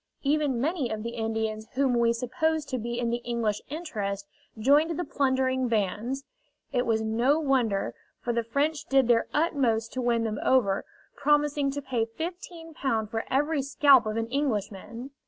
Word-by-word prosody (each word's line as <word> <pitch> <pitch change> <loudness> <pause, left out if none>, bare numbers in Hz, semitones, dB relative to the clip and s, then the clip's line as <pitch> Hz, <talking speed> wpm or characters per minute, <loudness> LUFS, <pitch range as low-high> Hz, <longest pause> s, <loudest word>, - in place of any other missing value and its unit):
Even 285 -3 +1
many 290 -1 0
of 215 -1 -3
the 235 - -3
Indians 220 -1 -2
whom 265 -1 +2
we 235 -1 +3
supposed 280 +6 -1
to 255 - -2
be 235 +1 -3
in 235 -1 0
the 240 - +1
English 230 -3 -1
interest 210 - -4 0.3
joined 290 +8 +3
the 355 - -1
plundering 260 -3 +1
bands; 230 +5 -1 0.5
it 245 -2 0
was 220 -1 +1
no 235 +7 +2
wonder, 240 - +1 0.3
for 240 - -2
the 235 - +1
French 290 +6 -1
did 270 -2 +3
their 235 -1 +3
utmost 255 -8 +1
to 255 - -2
win 235 -1 +1
them 215 -2 -2
over, 205 -7 +2 0.3
promising 295 -1 +2
to 285 +1 -4
pay 235 -4 -1
Ł15 320 - -4
for 225 0 -2
every 295 +2 +1
scalp 275 -3 +5
of 215 +1 -2
an 225 - 0
Englishman! 235 -2 -3
250 Hz, 165 wpm, -27 LUFS, 225-285 Hz, 0.5 s, scalp